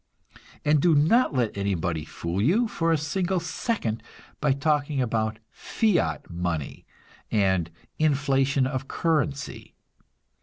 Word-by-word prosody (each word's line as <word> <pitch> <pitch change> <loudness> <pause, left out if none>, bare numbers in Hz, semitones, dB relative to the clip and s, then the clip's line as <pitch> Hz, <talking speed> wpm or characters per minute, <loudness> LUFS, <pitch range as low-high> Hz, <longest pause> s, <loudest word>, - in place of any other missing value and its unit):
And 150 -1 +4
do 170 -1 +4
not 160 - +4
let 120 -4 0
anybody 90 -5 -1
fool 85 +4 -3
you 200 - +3
for 165 -5 0
a 165 - +3
single 175 +5 -1
second 165 - -2 0.4
by 150 -2 +2
talking 145 +1 +1
about 110 -3 0
"fiat 215 -6 0
money" 85 -4 -4 0.4
and 95 -6 +1 0.3
"inflation 140 -3 +2
of 130 -1 -2
the 135 - -18
currency." 150 -4 -2
140 Hz, 120 wpm, -26 LUFS, 110-160 Hz, 0.4 s, And